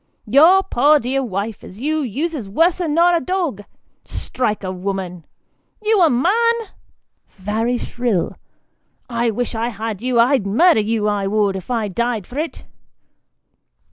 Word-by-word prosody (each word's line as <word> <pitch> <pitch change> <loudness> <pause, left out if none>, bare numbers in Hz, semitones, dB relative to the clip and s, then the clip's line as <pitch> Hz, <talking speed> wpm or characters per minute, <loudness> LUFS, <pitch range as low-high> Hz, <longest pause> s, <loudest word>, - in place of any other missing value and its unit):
Your 320 - +6
poor 295 -3 +3
dear 265 +2 -1
wife 210 -1 -4
as 195 - -11
you 310 +4 -1
uses 275 -2 -3
worser 335 - +2
nor 340 +3 +3
a 340 - +3
dog 345 - -2 0.4
strike 215 -5 -3
a 185 - -3
woman 185 -2 -5 0.5
you 430 -2 +2
a 335 - +6
man! 415 - +3 0.8
(very 220 +5 -1
shrill,) 235 -7 -2 0.8
I 235 0 +1
wish 245 +3 -2
I 225 +1 -1
had 220 -2 -5
you 250 -1 +1
I'd 240 -3 +3
murder 325 - +4
you, 215 0 -1
I 205 -2 0
would, 205 -1 +1
if 190 +3 -7
I 230 -4 0
died 230 +1 -2
for 260 +9 -6
it 320 +1 -5
240 Hz, 145 wpm, -19 LUFS, 210-310 Hz, 0.8 s, Your